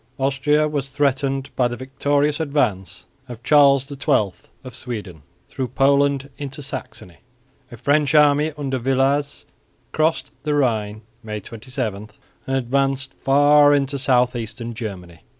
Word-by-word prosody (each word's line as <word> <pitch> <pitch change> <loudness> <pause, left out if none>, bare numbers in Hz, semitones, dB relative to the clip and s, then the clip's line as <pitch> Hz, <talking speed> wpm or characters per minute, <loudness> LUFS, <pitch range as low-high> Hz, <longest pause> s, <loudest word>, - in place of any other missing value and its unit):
Austria 140 +3 +1
was 145 -3 -3
threatened 135 -1 -1
by 125 - +2
the 120 0 -6
victorious 145 +3 0
advance 95 - -1 0.2
of 120 -1 -9
Charles 140 -2 +5
XII 135 - 0 0.3
of 130 -2 -10
Sweden 105 - -7 0.3
through 130 - -4
Poland 140 +1 +1
into 140 0 -6
Saxony. 90 -9 -8 0.5
A 120 - -10
French 145 +4 +1
army 150 +1 +4
under 135 -3 -2
Villars 135 +3 0 0.5
crossed 155 +1 0
the 150 0 -1
Rhine 110 -6 -1 0.2
(May 105 -2 -5
27) 110 -2 -6 0.4
and 135 - -1
advanced 135 +1 -1
far 145 +1 +4
into 140 0 -1
south 125 -2 +2
eastern 115 0 -5
Germany. 95 -7 -7
135 Hz, 130 wpm, -21 LUFS, 120-145 Hz, 0.5 s, Charles